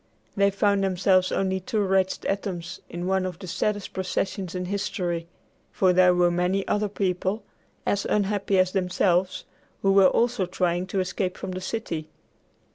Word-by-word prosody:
They 200 0 +4
found 200 0 +1
themselves 185 0 +2
only 190 -1 0
two 215 +4 -2
wretched 190 -1 +1
atoms 185 -3 -3
in 175 +1 -5
one 190 0 +1
of 185 -3 -4
the 190 - -9
saddest 205 +3 -2
processions 190 0 -2
in 180 0 -2
history, 180 -3 -2 0.4
for 185 -1 +3
there 180 0 +5
were 175 0 +3
many 180 +3 0
other 210 0 0
people, 190 +1 -1 0.4
as 200 - 0
unhappy 200 -1 +1
as 185 0 +3
themselves, 180 -1 +1 0.4
who 195 - +4
were 195 -1 +7
also 235 -5 +1
trying 180 0 0
to 190 0 0
escape 185 0 -2
from - - -5
the 185 0 -5
city. 185 -6 -4
190 Hz, 160 wpm, -25 LUFS, 180-200 Hz, 0.4 s, were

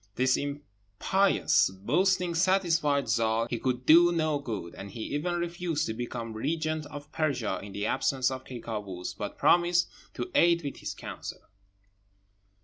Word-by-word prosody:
This 130 0 +3
impious 140 - +1
boasting 170 - +1
satisfied 165 -5 +2
Zâl 115 +1 +1
he 120 - -1
could 125 -1 -2
do 175 +2 +7
no 155 -3 +1
good; 110 -11 -5
and 100 - -8
he 110 +3 -8
even 175 +4 -1
refused 170 -2 -2
to 110 - -3
become 115 -1 -5
regent 155 +5 -2
of 145 0 -10
Persia 140 -9 -1
in 100 - -9
the 100 +1 -3
absence 135 0 +1
of 130 0 -5
Ky 125 -2 -8
Kâoos, 100 -6 -5
but 105 0 -5
promised 175 0 +3 0.3
to 365 - -4
aid 170 -1 +4
with 140 - -5
his - - -5
counsel. - - -7
140 Hz, 150 wpm, -28 LUFS, 115-170 Hz, 0.3 s, do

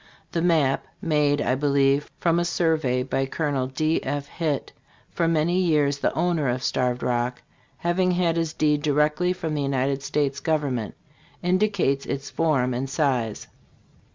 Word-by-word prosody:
The 165 - -1
map* 155 -6 +2
made, 145 -2 +1
I 125 - +1
believe, 140 +1 +2
from 170 0 +2
a - - +1
survey 160 -7 +1
by 135 +1 -1
Col. 140 -3 -1
D. 155 +5 0
F. 145 -1 -2
Hitt, 150 -1 -3 0.4
for 170 - 0
many 165 +2 +2
years 150 -5 +2
the - - +1
owner 165 -5 +1
of 125 +1 -2
Starved 125 -1 0
Rock, 125 0 -1 0.3
having 180 +2 +1
had 175 -2 +1
his 165 -2 -1
deed 150 -2 +1
directly 150 +4 +2
from 165 -4 -3
the 150 - -1
United 135 0 0
States 140 -1 -1
government 140 -8 -1 0.5
indicates 180 -6 +1
its 140 +1 -4
form 135 -6 +1
and 130 +2 -3
size. 130 -7 -1
145 Hz, 155 wpm, -24 LUFS, 135-165 Hz, 0.5 s, map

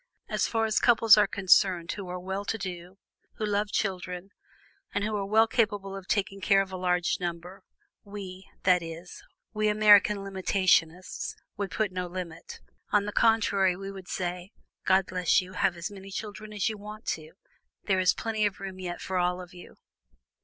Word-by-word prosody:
As - - 0
far 225 -1 0
as 215 -1 +2
couples 225 -3 +6
are 210 -1 +4
concerned 185 -3 +3
who 195 -3 -6
are 180 0 -4
well 190 +2 -4
to 225 - -2
do, 180 -2 -7 0.4
who 215 - -3
love 205 0 0
children, 185 -1 -3 0.6
and 205 - 0
who 215 0 -1
are 200 -1 -2
well 220 +2 +5
capable 205 -4 0
of 195 -1 -9
taking 195 -1 -1
care 195 0 +4
of 190 - -12
a - - -5
large 180 -1 0
number, 175 +1 -5 0.4
we, 195 -2 -9
that 180 -1 +4
is, 165 +1 -9 0.3
we 215 0 +1
American 210 -1 +6
limitationists, 185 -3 0 0.2
would 200 -1 -3
put 215 -3 -1
no 180 -1 -3
limit. 175 -2 -8 0.3
On 205 -1 +3
the 210 - -3
contrary, 205 -5 +3
we 195 +1 -7
would 190 -2 -10
say: 180 +1 -4 0.3
'God 190 0 +4
bless 180 0 +2
you, 185 -1 -7
have 185 -1 +1
as 170 +3 -5
many 195 -1 -10
children 215 +2 -7
as 205 -3 -1
you 215 -2 -3
want 210 +2 -10
to; 155 0 -4 0.5
there 190 -2 +1
is 185 0 +3
plenty 220 -1 -2
of 205 - -7
room 190 -1 -7
yet 175 -1 -5
for 185 -1 -2
all 180 0 0
of 180 -1 -10
you.'" 175 - -13
195 Hz, 185 wpm, -28 LUFS, 180-205 Hz, 0.6 s, couples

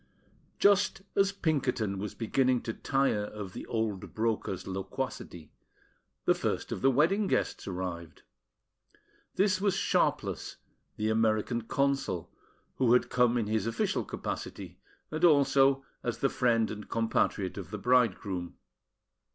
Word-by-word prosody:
Just 200 -1 +3
as 195 0 +3
Pinkerton 135 - -1
was 105 +1 -5
beginning 125 +2 +1
to 115 - -3
tire 135 -7 0
of 105 -3 -7
the - - -7
old 110 -4 -3
broker's 110 -4 -1
loquacity, 95 - -5 0.7
the - - +5
first - - -2
of - - -3
the 135 - +5
wedding 170 - +3
guests - - -1
arrived. 90 -3 -5 1.1
This 190 -1 +2
was 200 -2 +2
Sharpless, - - 0 0.4
the 110 0 0
American 110 +1 +1
Consul, 140 - 0 0.5
who 125 -2 +4
had 125 - +3
come 125 -1 +3
in 115 - 0
his 110 0 -1
official 115 0 0
capacity, 90 -2 -6 0.3
and 155 +2 -4
also 140 -3 +5 0.2
as 120 - -2
the 135 - +1
friend 115 -3 +2
and 105 0 -8
compatriot 110 -4 0
of 90 -4 -8
the 105 - -5
bridegroom. 100 -6 +1
115 Hz, 130 wpm, -30 LUFS, 100-135 Hz, 1.1 s, the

